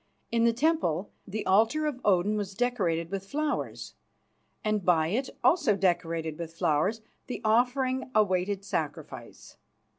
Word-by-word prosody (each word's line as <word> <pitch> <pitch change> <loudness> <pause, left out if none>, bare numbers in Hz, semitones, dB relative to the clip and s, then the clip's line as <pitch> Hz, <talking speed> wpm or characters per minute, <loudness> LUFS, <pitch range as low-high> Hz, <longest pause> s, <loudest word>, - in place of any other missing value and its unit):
In 230 0 +3
the 235 - +5
temple 230 - 0 0.2
the 210 +2 -4
altar 225 +11 +3
of 280 -4 -3
Odin 200 +1 +3
was 200 -2 -3
decorated 185 -10 0
with 195 -1 -4
flowers, 300 +5 -3 0.7
and 215 -2 0
by 165 -3 +3
it, 255 +8 -1
also 275 - +4
decorated 170 -4 -1
with 165 -1 -7
flowers, 170 +11 +1 0.3
the 250 - -4
offering 255 +4 +2
awaited 195 -1 +1
sacrifice. - - -5
205 Hz, 130 wpm, -28 LUFS, 180-245 Hz, 0.7 s, the